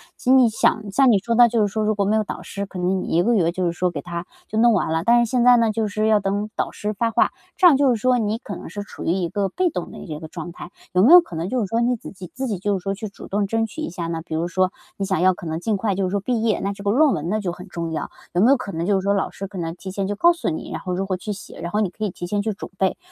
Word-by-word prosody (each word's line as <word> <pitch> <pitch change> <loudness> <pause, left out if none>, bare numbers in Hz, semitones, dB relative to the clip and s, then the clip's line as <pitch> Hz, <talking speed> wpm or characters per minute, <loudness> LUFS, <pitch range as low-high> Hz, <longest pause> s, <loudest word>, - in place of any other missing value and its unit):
其 - - -17
实 265 - +7
你 255 -3 +6
想 215 -1 +1
像 265 +3 +5
你 210 - +5
说 230 +4 -2
的， 240 0 +7
就 230 -2 +1
是 205 - +3
说 215 0 -1
如 215 0 +1
果 200 -1 0
没 210 +2 +2
有 220 - +2
导 - - -7
师， 200 0 -5
可 190 - -9
能 185 +1 0
你 - - -5
1 175 - +4
个 240 - +2
月 170 -6 +2
就 185 +1 -2
是 170 - +1
说 180 +1 0
给 155 -5 -5
它 170 +1 -5 0.2
就 220 - -2
弄 235 -1 +5
完 180 -5 0
了， 160 0 0
但 235 +4 +5
是 - - -7
现 250 -1 +2
在 245 0 +7
呢 230 -2 +3
就 220 0 -1
是 215 +1 -1
要 215 -1 +4
等 205 +2 -2
导 - - -1
师 210 +1 -4
发 230 +3 0
话， - - +3 0.3
这 365 - +7
样 300 -6 +6
就 280 -1 +3
是 - - 0
说 255 +1 +3
你 220 -1 0
可 205 -6 -7
能 - - -9
是 205 +4 -6
处 - - -10
于 - - +2
一 180 -2 -1
个 200 -1 -1
被 365 - +1
动 180 - -5
的 - - -10
一 - - -9
这 150 -2 -6
个 160 - -8
状 170 +1 -7
态， 175 +2 -10 0.2
有 180 +1 +4
没 260 - +6
有 355 - +11
可 175 - -10
能 165 +3 -2
就 255 - 0
是 210 - -1
说 225 +4 0
你 245 +1 +2
自 225 - -10
己 185 -2 -10
自 265 0 -3
己 210 - -2
就 205 0 0
是 180 - -10
说 195 - -1
去 215 +2 -6
主 - - -12
动 200 0 0
争 225 +1 0
取 225 +8 -8
一 - - -3
下 170 -1 -5
呢？ 165 -1 -3
比 160 - -7
如 170 +2 -1
说 185 +2 +1 0.3
你 195 - -2
想 190 -3 0
要 185 0 +5
可 175 - -10
能 160 0 -3
尽 210 +3 -1
快 200 0 0
就 195 - -1
是 180 - -1
说 200 - 0
毕 230 +3 -1
业， 225 -2 +1
那 200 +1 -2
这 200 0 -11
个 200 - +1
论 285 +4 +4
文 160 0 -3
呢 215 +3 0
就 185 -3 -2
很 180 +2 -11
重 170 -2 -4
要， 155 - -3 0.2
有 175 - +2
没 230 - +5
有 275 - +5
可 230 -5 -6
能 165 +1 -3
就 200 -1 +2
是 - - -6
说 200 +1 +2
老 200 - 0
师 195 - -7
可 195 - -10
能 165 -1 -3
提 190 +1 -8
前 195 0 -2
就 205 - -2
告 340 +12 +5
诉 335 - -3
你， 160 - -5
然 - - -4
后 180 - -3
如 190 +2 -1
何 190 -1 -1
去 210 +3 -5
写， 200 - -11
然 170 +1 -4
后 210 - 0
你 210 -4 +1
可 210 +4 -8
以 205 - -1
提 175 - -7
前 205 +2 0
去 215 +1 -2
准 200 - -8
备。 190 -1 +1
200 Hz, 385 characters per minute, -22 LUFS, 180-225 Hz, 0.3 s, 有